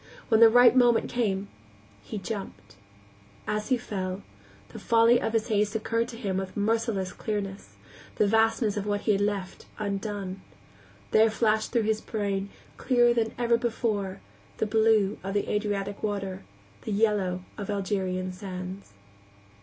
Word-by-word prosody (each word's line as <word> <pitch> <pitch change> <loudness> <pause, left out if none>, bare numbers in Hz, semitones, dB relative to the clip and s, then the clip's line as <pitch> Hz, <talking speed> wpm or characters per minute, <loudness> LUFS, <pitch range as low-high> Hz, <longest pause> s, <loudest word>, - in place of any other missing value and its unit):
When 220 -2 +4
the 230 -1 +9
right 245 +1 +6
moment 240 -2 +4
came, 200 -5 -1 0.5
he 210 - -7
jumped. 190 - -7 0.7
As 210 +3 -2
he 255 - +3
fell, 190 -3 -4 0.5
the - - -9
folly 230 +1 +4
of 225 - -2
his 225 +1 0
haste 210 0 +1
occurred 230 +1 0
to 235 - -9
him 195 -5 -2
with 190 +1 -5
merciless 210 -3 0
clearness, 200 -2 -5 0.4
the - - +3
vastness 225 0 +2
of 205 0 -3
what 205 0 0
he 215 - +1
had 200 -1 +1
left 200 -2 -3
undone. 200 -2 -4 0.7
There 220 +1 +5
flashed 220 0 +1
through 235 -2 +2
his 215 0 0
brain, 200 -2 -2 0.3
clearer 240 -2 +3
than 225 -2 -1
ever 235 -1 +2
before, 215 -5 -2 0.4
the - - 0
blue 220 -1 +2
of 195 +2 -2
Adriatic 205 -1 -2
water, 195 -2 -3 0.4
the - - -5
yellow 200 -4 +1
of 205 -2 -6
Algerian 190 -2 -2
sands. 185 - -7
210 Hz, 145 wpm, -27 LUFS, 195-225 Hz, 0.7 s, the